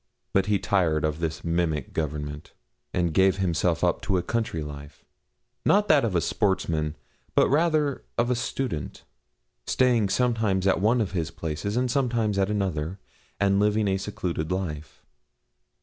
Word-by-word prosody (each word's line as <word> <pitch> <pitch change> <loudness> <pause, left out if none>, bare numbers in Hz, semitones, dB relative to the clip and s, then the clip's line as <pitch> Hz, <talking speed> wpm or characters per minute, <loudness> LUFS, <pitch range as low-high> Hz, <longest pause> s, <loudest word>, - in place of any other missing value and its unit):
But 95 0 +2
he 105 -1 +3
tired 80 -7 +1
of 75 0 -2
this 80 -1 -3
mimic 85 -4 -1
government, 75 -1 -4 0.4
and 85 -3 0
gave 95 +2 +4
himself 85 -3 0
up - - +2
to 95 -2 0
a 90 - -1
country 115 -8 -2
life, 70 -1 -10 0.6
not 205 +1 +3
that 150 -3 +5
of 110 -6 0
a 85 - +3
sportsman, 85 -7 0 0.4
but - - +5
rather 150 -2 +2
of 120 +1 +2
a - - +2
student, 115 - -3 0.6
staying 120 -6 +3
sometimes 110 -5 +1
at 95 - +2
one 115 +4 +3
of 105 - -2
his 85 -5 -2
places 80 +7 -4
and 125 -1 +1
sometimes 115 -7 +1
at 95 0 +2
another, 95 -4 -2 0.4
and 100 -1 +3
living 105 0 +2
a 95 0 +1
secluded 90 -5 -3
life. 80 -5 -4
95 Hz, 155 wpm, -26 LUFS, 80-110 Hz, 0.6 s, that